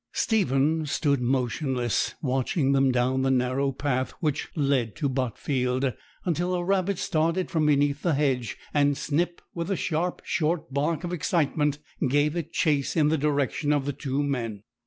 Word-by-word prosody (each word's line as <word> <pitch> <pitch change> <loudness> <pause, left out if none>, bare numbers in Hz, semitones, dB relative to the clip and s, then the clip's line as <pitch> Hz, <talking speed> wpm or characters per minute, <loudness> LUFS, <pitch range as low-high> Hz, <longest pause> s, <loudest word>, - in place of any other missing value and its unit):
Stephen 160 - +2
stood 140 -2 +1
motionless, 125 -1 0
watching 135 +2 +1
them 135 -1 +4
down 125 +1 +1
the 135 - +1
narrow 130 +2 +1
path 130 -1 -1
which 150 -5 -1
led 135 -7 +1
to 150 -2 -1
Botfield, 130 0 -1 0.3
until 175 +1 0
a 175 - -1
rabbit 195 0 +1
started 165 +4 0
from 155 -2 +2
beneath 145 0 +2
the 170 -5 +1
hedge, 135 -5 0 0.2
and 145 -1 +3
Snip, 170 +4 -1
with 170 +1 -4
a 195 - +1
sharp, 170 +1 -2
short 160 -3 -1
bark 150 +3 0
of 175 0 -3
excitement, 150 -4 +1 0.3
gave 145 +3 +2
it 165 -1 -3
chase 150 -5 +1
in 150 -3 +4
the 160 - +3
direction 145 0 0
of 145 -2 +1
the 145 - -1
two 135 +2 -2
men. 115 -7 -3
145 Hz, 160 wpm, -26 LUFS, 130-160 Hz, 0.3 s, them